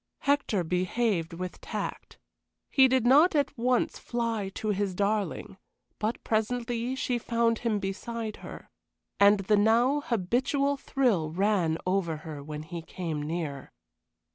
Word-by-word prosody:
Hector 280 -9 +1
behaved 180 0 0
with 180 +1 -6
tact; - - -5 0.5
he 265 -2 +6
did 260 -2 +2
not 300 +8 +6
at 285 -2 +1
once 250 +1 +1
fly 230 -4 -2
to 215 - -3
his 200 -2 -1
darling, 200 -1 -1 0.4
but 215 +2 -2
presently 235 +2 -1
she 250 -2 -1
found 230 -1 +1
him 230 -3 0
beside 215 +3 -4
her. - - -11 0.5
And 200 0 +6
the 210 +2 +2
now 235 +7 +3
habitual 260 +5 0
thrill 245 - 0
ran 180 -2 +1
over 185 -4 0
her 150 -3 -6
when 150 +1 -6
he 170 +1 -6
came 165 -3 -4
near. 150 -3 -4
215 Hz, 135 wpm, -28 LUFS, 180-240 Hz, 0.5 s, he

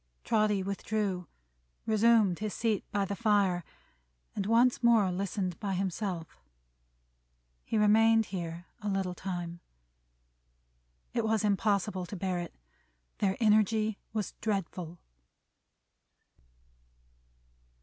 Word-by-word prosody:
Trotty 210 -3 +2
withdrew, 200 -2 -2 0.6
resumed 220 -4 +4
his 210 -2 -3
seat 220 -3 0
by 200 -1 +1
the 200 +1 -3
fire, 200 -5 +2 0.7
and 195 - -2
once 235 +3 +4
more 225 -5 +4
listened 185 -1 -3
by 195 -2 -2
himself. 185 - -3 1.2
He 225 - -2
remained 225 +1 +5
here 170 -1 -4 0.2
a 205 - -2
little 195 -2 -1
time. 175 -2 -5 1.5
It 235 - 0
was 220 -1 +1
impossible 200 -2 +1
to 205 - -6
bear 185 -1 -2
it; 175 - -7 0.6
their 195 -1 +1
energy 215 -1 +3
was 215 -2 -3
dreadful. 180 -5 -3
200 Hz, 100 wpm, -30 LUFS, 185-215 Hz, 1.5 s, remained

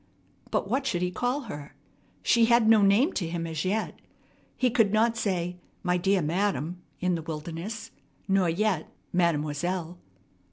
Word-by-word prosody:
But - - 0
what 265 +6 0
should 180 -8 0
he 180 - 0
call 245 +8 -1
her? 150 - -8 0.5
She 235 -1 +5
had 235 -1 +4
no 220 -1 +7
name 205 - +4
to 175 - -2
him 165 0 -3
as 160 -1 -3
yet. 210 +4 -1 0.6
He 255 -2 +2
could 225 -4 +3
not 225 +2 +3
say, 180 -5 -1 0.3
"My 180 0 +2
dear 190 0 +2
madam" 180 0 -1 0.2
in 180 0 +1
the 165 - -1
wilderness, 165 +7 -6 0.4
nor 195 -3 +3
yet 185 -1 0 0.2
"mademoiselle." 170 +1 0
185 Hz, 155 wpm, -27 LUFS, 170-220 Hz, 0.6 s, no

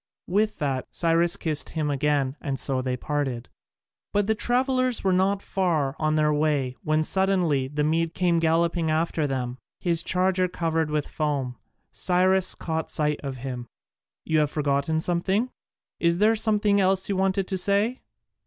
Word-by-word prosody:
With 210 +4 0
that 135 -3 -2
Cyrus 170 0 +1
kissed 155 -4 -2
him 155 -2 -2
again 140 -1 0
and 140 -4 -3
so 130 -1 0
they 130 0 -2
parted. 135 -4 -3 0.6
But 205 0 +1
the 220 - +2
travellers 255 +2 0
were 190 -1 +2
not 195 +2 +1
far 160 -8 0
on 155 0 +1
their 150 -1 +2
way 145 -4 0
when 155 0 +1
suddenly 180 -7 +1
the 150 +2 -2
Mede 165 +2 0
came 175 -2 +2
galloping 165 0 +1
after 160 -1 0
them, 130 -2 -3 0.2
his 170 -2 +1
charger 185 +1 +1
covered 165 -3 -1
with 150 -1 -1
foam. 140 -5 -2 0.4
Cyrus 185 +1 +2
caught 160 -1 -3
sight 150 -1 0
of 135 -2 -5
him: 125 -2 -5 0.6
"You 160 -1 +2
have 150 -1 +2
forgotten 150 +1 0
something? 190 +8 0 0.5
There 175 +6 +3
is 225 -1 +1
something 210 -2 +2
else 190 0 +2
you 200 - -1
wanted 190 0 0
to 190 - -1
say?" 205 +6 +2
165 Hz, 160 wpm, -25 LUFS, 150-190 Hz, 0.6 s, There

